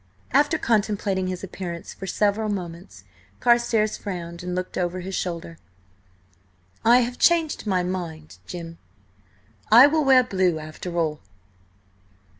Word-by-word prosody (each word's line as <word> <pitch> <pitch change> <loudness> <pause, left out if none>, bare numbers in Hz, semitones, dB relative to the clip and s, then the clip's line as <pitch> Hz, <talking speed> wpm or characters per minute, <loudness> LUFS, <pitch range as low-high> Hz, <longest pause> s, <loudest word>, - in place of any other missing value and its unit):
After 290 +4 +3
contemplating 205 -5 0
his 185 0 -5
appearance 175 -3 -6
for 195 - -8
several 210 +3 0
moments, 170 - -6 0.4
Carstares 235 -3 +2
frowned 170 -3 -6
and 180 0 -4
looked 185 0 -4
over 180 0 -2
his 190 +2 -6
shoulder. 170 -3 -4 1.2
"I 240 +2 +6
have 245 +1 -3
changed 330 -8 +2
my 185 -3 +1
mind, 170 -4 -5
Jim. 165 -2 -8 0.9
I 240 +4 +10
will 305 +2 +2
wear 265 -2 +6
blue 185 -7 +1
after 155 +3 -7
all." 155 -3 0
185 Hz, 125 wpm, -24 LUFS, 175-225 Hz, 1.2 s, I